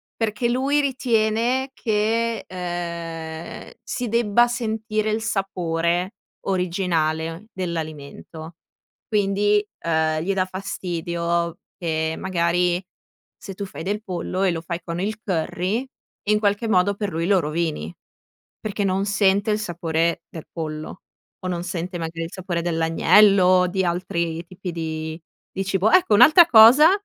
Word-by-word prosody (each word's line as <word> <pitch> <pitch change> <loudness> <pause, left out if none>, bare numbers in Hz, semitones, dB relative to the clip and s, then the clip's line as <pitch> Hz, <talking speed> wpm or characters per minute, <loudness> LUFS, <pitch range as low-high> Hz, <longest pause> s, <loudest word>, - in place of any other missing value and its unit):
perché 225 +1 -1
lui 270 +4 +1
ritiene 245 -1 +1
che, 225 0 0
uhm, 170 -2 -6
si 250 -2 -3
debba 235 +1 +3
sentire 220 -2 -2
il 220 +1 -1
sapore 180 -3 -1 0.3
originale 170 -2 -1
dell'alimento. 160 -2 -6 0.5
Quindi, 205 0 +2 0.2
uhm, 160 -1 +1
gli 195 +4 0
dà 185 -1 +1
fastidio 170 -3 -3 0.2
che 160 -3 -1
magari, 175 0 0 0.5
se 195 - -8
tu 200 - -4
fai 190 - -8
del 205 +4 -2
pollo 185 -1 -3
e 190 - +3
lo 165 -1 -3
fai 170 +1 -5
con 170 0 -4
il 215 +2 -3
curry, 185 +6 -1 0.4
in 210 0 +4
qualche 205 +2 +1
modo 200 0 +3
per 205 0 -3
lui 165 +1 -2
lo 195 -1 +4
rovini, 155 - -2 0.7
perché 210 -1 -3
non 195 +1 0
sente 200 +1 +2
il 210 - +1
sapore 170 -3 -1
del 160 - -9
pollo 155 +1 -6 0.4
o 185 - -4
non 175 -1 -3
sente 180 0 -4
magari 165 0 -4
il 165 - -7
sapore 180 -2 -3
dell'agnello, 180 +3 +4
di 190 +1 0
altri 170 -1 -2
tipi 185 +1 -7
di 160 0 -4 0.3
di 195 - -3
cibo. 195 +2 +1
Ecco, 360 -7 +4
un'altra 310 - +8
cosa 255 +4 +8
185 Hz, 135 wpm, -23 LUFS, 170-210 Hz, 0.7 s, un'altra